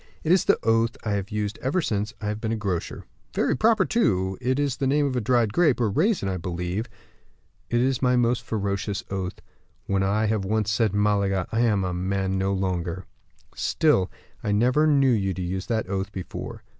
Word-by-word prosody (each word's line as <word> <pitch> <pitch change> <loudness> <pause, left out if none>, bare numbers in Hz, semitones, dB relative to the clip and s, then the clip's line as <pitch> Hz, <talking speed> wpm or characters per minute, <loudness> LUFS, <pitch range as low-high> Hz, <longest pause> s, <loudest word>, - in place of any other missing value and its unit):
"It 160 - +1
is 185 -1 +4
the - - +4
oath 115 +1 +2
I 110 - -2
have 100 -1 -2
used 105 -2 -3
ever 135 +8 0
since 105 - -1
I 110 - -6
have 105 +1 -4
been 110 -1 -2
a - - 0
grocer." 95 -6 -3 0.3
"Very - - +2
proper, 220 - +3
too; 95 - +1
it 130 +1 0
is 140 -3 0
the 135 - 0
name 145 +2 +2
of 135 -2 -1
a 125 - 0
dried 115 -1 +2
grape, 155 -9 +3
or 115 -4 +1
raisin, 175 - +1
I 95 -1 -1
believe?" 90 +4 -3 0.8
"It 120 - +1
is 130 0 +1
my 125 -1 +3
most 120 0 +2
ferocious 100 -3 -2
oath; 95 -1 -3 0.5
when 100 -1 0
I 100 +3 +1
have 105 -2 0
once 110 +2 0
said 110 -3 +1
Malaga! 100 -2 +1
I 115 - 0
am 110 -5 +2
a 90 -1 -2
man 95 +1 -1
no 95 +1 0
longer." 95 -2 -2 0.5
"Still, 145 - +2 0.3
I 105 - -1
never 125 +9 +3
knew 140 -3 +4
you 95 -5 0
use 95 +1 -3
that 110 -4 -1
oath 95 +1 -3
before." 95 -3 -7
105 Hz, 200 wpm, -25 LUFS, 95-125 Hz, 0.8 s, is